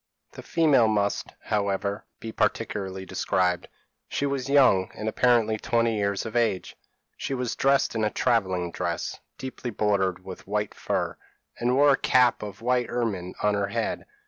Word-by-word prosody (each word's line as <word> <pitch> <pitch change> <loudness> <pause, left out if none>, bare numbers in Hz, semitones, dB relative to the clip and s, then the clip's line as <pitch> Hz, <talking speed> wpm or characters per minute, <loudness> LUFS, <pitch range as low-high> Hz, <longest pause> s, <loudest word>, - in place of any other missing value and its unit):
p> - - -19
"The - - -6
female 150 -9 +4
must, 100 -2 0 0.2
however, 100 0 -1
be 115 - -6
particularly 95 -3 -2
described. 90 -2 0 0.4
She 140 - -1
was 135 -2 -2
young, 130 -10 +5
and 110 - -5
apparently 110 -1 +2
twenty 115 0 +1
years 100 0 -1
of 110 - -6
age. 115 -6 0 0.4
She 135 - -3
was 125 -2 -2
dressed 135 0 +2
in 110 -1 -1
a 105 - +2
travelling 95 -7 0
dress, 85 0 -3 0.2
deeply 130 -1 -6
bordered 95 -4 0
with 95 -1 -9
white 105 0 -1
fur, - - -2 0.4
and 125 +1 +1
wore 145 +1 +6
a 135 - +4
cap 125 -1 +3
of 105 +1 -8
white 125 -1 +1
ermine 105 -7 -2
on 105 0 +3
her 100 -1 0
head. 115 -2 -3
110 Hz, 165 wpm, -26 LUFS, 95-125 Hz, 0.4 s, wore